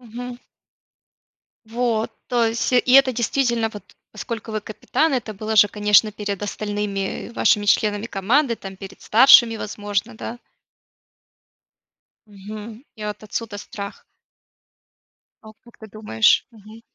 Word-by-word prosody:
Мгм. 245 Hz, +1 st, -8 dB, 1.3 s
Вот, 230 Hz, -1 st, -1 dB, 0.2 s
то 240 Hz, -2 st, +2 dB
есть 230 Hz, +3 st, -1 dB
и 250 Hz, 0 st, +3 dB
это 270 Hz, -1 st, +7 dB
действительно, 235 Hz, -1 st, 0 dB
вот 210 Hz, -2 st, -10 dB, 0.3 s
поскольку 225 Hz, -1 st, -6 dB
вы 215 Hz, -1 st, -3 dB
капитан, 275 Hz, +8 st, -1 dB
это 235 Hz, -4 st, -3 dB
было 215 Hz, +2 st, -4 dB
же 210 Hz, -, +7 dB
конечно 210 Hz, +1 st, +3 dB
перед 205 Hz, -2 st, -5 dB
остальными, 205 Hz, -1 st, -4 dB
э, -, -, -13 dB
вашими 205 Hz, -3 st, +2 dB
членами 205 Hz, +1 st, +1 dB
команды, 235 Hz, +6 st, +1 dB
там 195 Hz, -3 st, -10 dB
перед 195 Hz, -1 st, -11 dB
старшими 235 Hz, -1 st, +6 dB
возможно, 205 Hz, +2 st, -4 dB
да? 235 Hz, +2 st, -7 dB, 1.9 s
Мгм. 215 Hz, +3 st, -10 dB
И 215 Hz, -2 st, -7 dB
вот 210 Hz, +1 st, -6 dB
отсюда 215 Hz, 0 st, -5 dB
страх. 200 Hz, 0 st, -8 dB, 1.4 s
А 215 Hz, -, -12 dB
как 235 Hz, -, -19 dB
ты 220 Hz, -, -12 dB
думаешь? 200 Hz, -, +2 dB
Мгм. 220 Hz, 0 st, -15 dB
215 Hz, 125 wpm, -21 LUFS, 205-235 Hz, 1.9 s, это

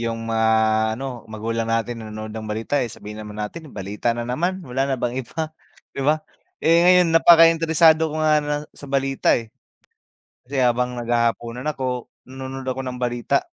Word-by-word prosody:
yung 115 Hz, -1 st, -3 dB
mga 115 Hz, 0 st, +1 dB, 0.5 s
ano, 130 Hz, -2 st, -6 dB
magulang 115 Hz, +1 st, -3 dB
natin 115 Hz, 0 st, -1 dB
nanonood 110 Hz, 0 st, -7 dB
ng 110 Hz, -1 st, -6 dB
balita, 115 Hz, +6 st, -1 dB
eh, 120 Hz, -, -2 dB
sabihin 105 Hz, -1 st, -9 dB
naman 105 Hz, 0 st, -9 dB
natin 150 Hz, +10 st, -6 dB
balita 105 Hz, +4 st, -3 dB
na 120 Hz, -, -3 dB
naman, 175 Hz, +10 st, -1 dB
wala 135 Hz, +1 st, -1 dB
na 135 Hz, -, 0 dB
bang 120 Hz, +1 st, -2 dB
iba, 155 Hz, +6 st, -5 dB, 0.4 s
'di -, -, -4 dB
ba? 150 Hz, +3 st, +3 dB, 0.4 s
Eh, 165 Hz, +1 st, +5 dB
ngayon 180 Hz, -2 st, +5 dB
napakainteresado 165 Hz, -1 st, +6 dB
ko -, -, -6 dB
nga 155 Hz, -1 st, +4 dB
na 145 Hz, 0 st, -1 dB, 0.2 s
sa 145 Hz, -, -11 dB
balita 135 Hz, 0 st, +2 dB
eh. 115 Hz, -2 st, -10 dB, 1.0 s
Kasi 140 Hz, +1 st, -5 dB
habang 125 Hz, 0 st, +1 dB
naghahapunan 120 Hz, +2 st, -1 dB
ako, 125 Hz, -2 st, -3 dB, 0.2 s
nanonood 130 Hz, 0 st, -7 dB
ako 130 Hz, 0 st, -2 dB
ng 125 Hz, -, -5 dB
balita. 120 Hz, -, 0 dB
125 Hz, 170 wpm, -22 LUFS, 115-150 Hz, 1.0 s, napakainteresado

